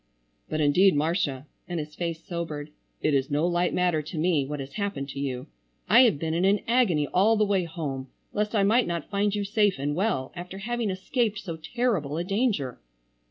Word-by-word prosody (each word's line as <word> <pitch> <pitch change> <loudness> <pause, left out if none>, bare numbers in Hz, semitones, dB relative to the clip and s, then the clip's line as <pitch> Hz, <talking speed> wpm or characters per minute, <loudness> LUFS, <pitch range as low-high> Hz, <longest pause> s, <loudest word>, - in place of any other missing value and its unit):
"But, 155 - -1
indeed, 175 +6 +5
Marcia," 145 -3 0 0.2
and 175 -2 -3
his 150 0 -6
face 170 -1 -4
sobered, 155 -4 -5 0.3
"it 150 - +2
is 135 -1 +1
no 150 +3 +1
light 175 0 +1
matter 175 -3 +1
to 155 +3 -8
me, 155 -4 +2
what 150 0 -4
has 135 0 -7
happened 200 -9 -3
to 140 - -6
you. 130 -2 -3 0.4
I 230 - +7
have 215 -11 +3
been 160 +2 -2
in 170 +2 +1
an 200 +2 +3
agony 225 -11 +3
all 200 +9 +3
the 215 - +3
way 195 -3 +1
home 145 -6 -4 0.3
lest 210 +2 -1
I 200 - +4
might 225 +5 +3
not 170 -1 -4
find 205 0 +1
you 205 - -1
safe 205 -1 +2
and 145 +2 -1
well 160 -7 0
after 180 +2 -7
having 235 +2 -2
escaped 210 +3 -1
so 175 -5 -5
terrible 165 - -1
a 170 - -1
danger." 195 - 0
175 Hz, 205 wpm, -26 LUFS, 150-205 Hz, 0.4 s, I